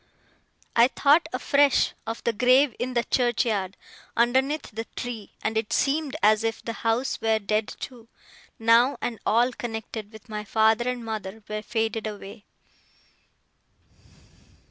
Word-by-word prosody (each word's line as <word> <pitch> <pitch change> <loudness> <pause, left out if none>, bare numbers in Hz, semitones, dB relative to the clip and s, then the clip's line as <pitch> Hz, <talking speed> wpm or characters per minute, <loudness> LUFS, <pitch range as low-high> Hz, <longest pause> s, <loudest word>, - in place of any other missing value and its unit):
I 235 +1 +7
thought 300 +5 +3
afresh 280 -2 +3
of 225 +1 -5
the 235 - +1
grave 255 +3 +4
in 255 0 -3
the 235 - +2
churchyard, 220 -7 0 0.4
underneath 265 +5 +1
the 225 +1 -5
tree: 235 -4 -6
and 220 - -1
it 220 -1 -1
seemed 290 0 0
as 215 +1 +5
if 225 0 -3
the 230 - -3
house 230 +4 0
were 225 0 +2
dead 215 +1 -1
too, 240 -3 -9 0.5
now, 230 +4 +4
and 230 -3 -4
all 240 +4 +3
connected 220 -3 -6
with 220 0 -14
my 210 -1 -5
father 220 +3 +2
and 245 -2 -4
mother 215 -1 -6
were 215 0 -4
faded 225 0 -2
away. 205 0 -9
225 Hz, 140 wpm, -25 LUFS, 220-250 Hz, 0.5 s, I